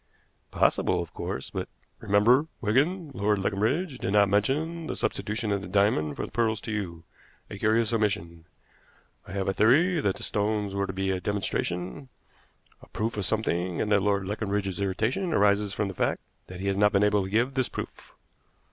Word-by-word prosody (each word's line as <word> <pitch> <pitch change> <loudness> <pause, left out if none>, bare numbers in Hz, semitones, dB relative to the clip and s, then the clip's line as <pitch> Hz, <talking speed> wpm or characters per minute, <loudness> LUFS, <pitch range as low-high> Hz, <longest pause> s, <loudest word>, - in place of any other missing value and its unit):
"Possible, 90 - +2
of 85 -2 -5
course, 65 - -5
but - - -4 0.2
" - - -43
"Remember, 120 +9 +4
Wigan, 145 - +1
Lord 105 -2 +1
Leconbridge 120 - -1
did 95 - -2
not 100 -1 +5
mention 155 +11 0
the - - -3
substitution 105 +2 -2
of 100 -1 0
the 95 - -7
diamonds 95 -6 +2
for - - -3
the - - -12
pearls 110 -1 +1
to 110 - -5
you 90 -6 -4 0.5
a 100 - -7
curious 110 +2 +2
omission. 100 -7 -1 0.8
I - - -8
have 100 -1 -2
a 95 - +1
theory 155 - +4
that 100 -7 +1
the - - -9
stones 105 -1 -1
were 100 0 -1
to - - -3
be 95 +1 -1
a 95 -1 -2
demonstration, 95 +4 -3 0.7
a - - -15
proof 115 +2 -3
of 100 -2 -1
something, 90 -5 -1
and 105 - -1
that 105 -1 +4
Lord 100 -1 +1
Leconbridge's 100 -2 -2
irritation 115 - 0
arises 100 0 +3
from 105 0 -1
the 95 - -5
fact - - 0 0.3
that 90 0 -8
he - - -4
has 100 -1 0
not 105 +1 +4
been 100 0 +4
able 105 -1 +3
to 95 - -5
give 120 +6 +1
this 130 -2 0
proof." - - -8
105 Hz, 190 wpm, -27 LUFS, 95-115 Hz, 0.8 s, not